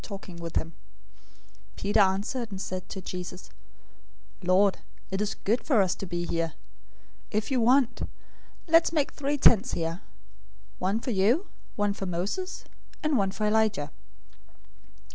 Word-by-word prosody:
017:004 170 Hz, -5 st, -4 dB, 1.0 s
Peter 205 Hz, +2 st, +1 dB
answered, 205 Hz, +5 st, +1 dB
and 195 Hz, -2 st, -6 dB
said 185 Hz, -1 st, -5 dB
to 190 Hz, -, -6 dB
Jesus, 180 Hz, 0 st, -7 dB, 0.9 s
"Lord, 185 Hz, +2 st, +3 dB, 0.3 s
it 195 Hz, +1 st, -1 dB
is 210 Hz, 0 st, -1 dB
good 230 Hz, +5 st, 0 dB
for 265 Hz, -8 st, +3 dB
us 185 Hz, -, 0 dB
to 195 Hz, -, -7 dB
be 175 Hz, 0 st, -2 dB
here. 165 Hz, -2 st, -1 dB, 0.8 s
If 215 Hz, +4 st, -1 dB
you 255 Hz, -2 st, +2 dB
want, 250 Hz, +2 st, +3 dB, 0.6 s
let's 330 Hz, 0 st, +5 dB
make 300 Hz, -4 st, +1 dB
three 290 Hz, 0 st, -1 dB
tents 240 Hz, -3 st, +5 dB
here: 165 Hz, +1 st, -2 dB, 0.8 s
one 195 Hz, +5 st, 0 dB
for 250 Hz, -, -2 dB
you, 225 Hz, -, +3 dB, 0.3 s
one 205 Hz, -1 st, +1 dB
for 195 Hz, -1 st, -5 dB
Moses, 195 Hz, -, -3 dB, 0.4 s
and 305 Hz, -2 st, +2 dB
one 195 Hz, -5 st, +2 dB
for 210 Hz, +2 st, -2 dB
Elijah." 210 Hz, -9 st, +2 dB
200 Hz, 135 wpm, -28 LUFS, 185-240 Hz, 1.0 s, let's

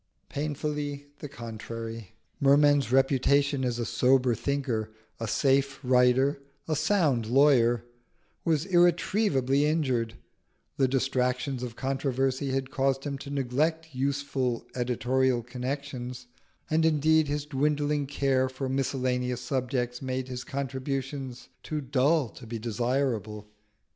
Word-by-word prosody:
Painfully 145 Hz, -1 st, -3 dB
the 145 Hz, -, -7 dB
contrary. 115 Hz, -3 st, -7 dB, 0.3 s
Merman's 140 Hz, -2 st, +4 dB
reputation 135 Hz, +1 st, +3 dB
as 120 Hz, -2 st, -1 dB
a 120 Hz, -, -2 dB
sober 125 Hz, +2 st, +3 dB
thinker, 125 Hz, -3 st, -2 dB, 0.3 s
a 115 Hz, -, -3 dB
safe 135 Hz, +3 st, +2 dB
writer, 125 Hz, +2 st, +3 dB, 0.3 s
a 155 Hz, -, 0 dB
sound 150 Hz, -, +2 dB
lawyer, 120 Hz, -3 st, +4 dB, 0.6 s
was 160 Hz, -1 st, +1 dB
irretrievably 175 Hz, -, +3 dB
injured: 130 Hz, -7 st, 0 dB, 0.6 s
the 135 Hz, -2 st, +3 dB
distractions 130 Hz, 0 st, 0 dB
of 120 Hz, -2 st, -5 dB
controversy 135 Hz, 0 st, -1 dB
had 130 Hz, 0 st, -2 dB
caused 135 Hz, 0 st, 0 dB
him 140 Hz, -2 st, -4 dB
to 140 Hz, -, -8 dB
neglect 145 Hz, +4 st, -1 dB
useful 135 Hz, -2 st, -1 dB
editorial 125 Hz, 0 st, +1 dB
connections, 125 Hz, 0 st, -5 dB, 0.4 s
and 160 Hz, +1 st, +2 dB
indeed 160 Hz, 0 st, +3 dB
his 145 Hz, 0 st, -2 dB
dwindling 145 Hz, 0 st, 0 dB
care 135 Hz, -2 st, +1 dB
for 130 Hz, +1 st, -4 dB
miscellaneous 125 Hz, -2 st, -1 dB
subjects 125 Hz, -1 st, -2 dB
made 130 Hz, -1 st, -3 dB
his 125 Hz, -1 st, -5 dB
contributions 135 Hz, -2 st, -4 dB
too 155 Hz, -, -3 dB
dull 140 Hz, +2 st, +2 dB
to 120 Hz, -, -12 dB
be 115 Hz, +1 st, -4 dB
desirable. 115 Hz, -2 st, -2 dB
135 Hz, 115 wpm, -28 LUFS, 125-145 Hz, 0.6 s, Merman's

